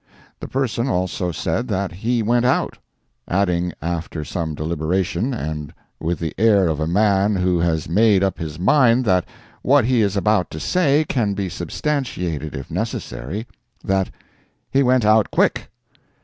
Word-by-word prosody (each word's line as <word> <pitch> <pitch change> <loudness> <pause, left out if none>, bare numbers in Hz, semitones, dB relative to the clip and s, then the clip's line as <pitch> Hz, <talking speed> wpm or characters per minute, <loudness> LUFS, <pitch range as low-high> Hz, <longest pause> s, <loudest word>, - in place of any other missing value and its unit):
The - - -6
person 130 -2 -1
also 90 -3 -1
said 115 +8 -2
that 100 -3 -1
he 115 +6 -1
went 120 +2 +2
out—adding 90 -7 -2
after 85 -2 -3
some 80 -2 -3
deliberation, 85 - -1
and 75 - -4 0.3
with 85 +2 -1
the 80 -3 -4
air 105 -4 +4
of 80 -2 -1
a 80 - -1
man 100 +2 +2
who 90 -1 +1
has 80 -2 0
made 100 +3 +4
up 95 - -1
his 80 -2 -5
mind 125 +5 +4
that 90 -4 +2 0.4
what 135 -2 +4
he 125 -1 +3
is 100 -1 +1
about 105 -3 +2
to 80 - -7
say 155 - +2
can 105 -6 0
be 95 -2 -2
substantiated 90 - -3
if 65 -2 -7
necessary, 95 - -4 0.4
that 95 -1 0 0.6
"he 135 - +3
went 125 -3 +3
out 110 -1 +4
quick." - - +1
95 Hz, 150 wpm, -21 LUFS, 85-115 Hz, 0.6 s, air